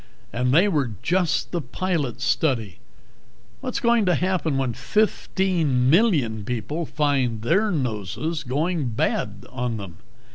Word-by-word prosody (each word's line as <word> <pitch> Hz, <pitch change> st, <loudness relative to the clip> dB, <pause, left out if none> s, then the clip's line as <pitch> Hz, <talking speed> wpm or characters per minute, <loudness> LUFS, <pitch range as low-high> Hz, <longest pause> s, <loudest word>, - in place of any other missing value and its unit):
And 125 Hz, +1 st, +1 dB
they 170 Hz, +9 st, +5 dB
were 145 Hz, -, 0 dB
just 175 Hz, -3 st, +1 dB
the 175 Hz, -, -1 dB
pilot 140 Hz, -2 st, -2 dB
study! 120 Hz, -, 0 dB, 0.8 s
What's 255 Hz, -2 st, -3 dB
going 235 Hz, -4 st, +3 dB
to 180 Hz, -, +4 dB
happen 175 Hz, -4 st, 0 dB
when 130 Hz, -3 st, 0 dB
fifteen 170 Hz, -, +1 dB
million 150 Hz, -, +3 dB
people 125 Hz, +9 st, -3 dB
find 135 Hz, -7 st, 0 dB
their 195 Hz, -, +2 dB
noses 135 Hz, -, -2 dB
going 150 Hz, +1 st, -1 dB
bad 105 Hz, -2 st, -2 dB
on 125 Hz, -3 st, -2 dB
them?" 95 Hz, -5 st, -8 dB
145 Hz, 130 wpm, -24 LUFS, 120-180 Hz, 0.8 s, they